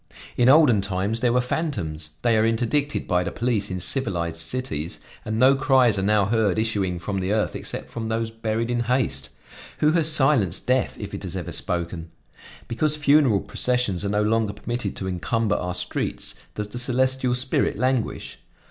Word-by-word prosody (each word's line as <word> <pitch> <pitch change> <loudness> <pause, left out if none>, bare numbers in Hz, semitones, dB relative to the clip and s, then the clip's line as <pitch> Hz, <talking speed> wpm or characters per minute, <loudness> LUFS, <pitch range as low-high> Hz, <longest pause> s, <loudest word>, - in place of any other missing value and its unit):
In 120 +1 +4
olden 135 -8 +6
times 100 +3 -1
there 120 -1 +2
were 125 +1 +3
fantoms; 80 - -3
they 120 -2 +3
are 110 - +3
interdicted 120 +6 0
by 90 0 +1
the 100 - -3
police 110 -3 -1
in 95 -1 -3
civilized 85 - 0
cities 85 - -3 0.2
and 110 0 -3
no 130 +3 +6
cries 130 -6 +3
are - - 0
now 105 0 +2
heard 110 -2 +1
issuing 100 -5 -1
from 95 +3 -3
the 95 +1 -2
earth 110 0 0
except - - -6
from 115 -1 -4
those 115 0 -2
buried 115 +1 -2
in 120 - 0
haste. 110 - 0 0.5
Who 150 - +3
has 160 -1 +3
silenced 135 - +3
death 130 0 0
if - - -7
it - - -5
has - - -5
ever - - -5
spoken? 85 -1 -3 0.6
Because 150 +6 0
funeral 140 -8 +4
processions 125 -7 0
are 100 - -1
no 105 +1 +1
longer 110 -1 +1
permitted 120 0 -4
to 95 - -5
encumber 105 +4 -1
our 90 0 -3
streets, - - -2 0.2
does 105 -1 -4
the 120 - -5
celestial 130 0 +2
spirit 130 -3 0
languish? 130 0 -2
115 Hz, 180 wpm, -23 LUFS, 100-125 Hz, 0.6 s, olden